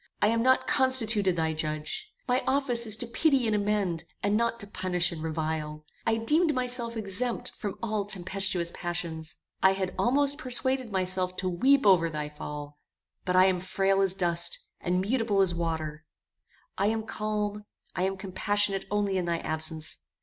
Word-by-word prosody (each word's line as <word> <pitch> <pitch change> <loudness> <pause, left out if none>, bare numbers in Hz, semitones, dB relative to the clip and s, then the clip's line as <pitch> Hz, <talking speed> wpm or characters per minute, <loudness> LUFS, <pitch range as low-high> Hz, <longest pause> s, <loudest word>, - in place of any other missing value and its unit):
I 210 - +3
am 230 0 +1
not 260 +2 +3
constituted 225 -8 +4
thy 160 -1 0
judge. 155 - -4 0.2
My 250 0 +1
office 255 -4 +3
is 215 - +6
to 240 - -5
pity 265 +2 +2
and 220 -1 +1
amend, 200 -5 0 0.2
and 205 +1 +2
not 235 +1 0
to - - -6
punish 185 -3 0
and 165 -2 -6
revile. 155 -1 -3 0.2
I 225 0 +3
deemed 300 +7 +2
myself 245 -2 -1
exempt 220 +4 -1
from 205 -3 -5
all 215 -3 -1
tempestuous 190 -3 -2
passions. 170 -2 -4 0.3
I 190 0 +5
had 190 -1 -3
almost 285 +3 +2
persuaded 255 -2 0
myself 185 -1 0
to 185 - -1
weep 265 +10 +3
over 180 -4 +5
thy 150 -1 -4
fall; 150 -1 -8 0.5
but 180 -1 0
I 185 0 +7
am 185 -1 +2
frail 195 +1 +1
as 190 -1 +2
dust, 170 -2 0 0.2
and 180 +1 0
mutable 220 -1 0
as 190 -3 +3
water; 160 -2 -3 0.8
I 200 - +3
am 220 +1 0
calm, 210 -1 -3 0.3
I - - -2
am 190 +1 0
compassionate 195 +1 0
only 205 -2 0
in 180 - -2
thy 170 -1 0
absence. 155 0 -3
195 Hz, 170 wpm, -28 LUFS, 175-225 Hz, 0.8 s, I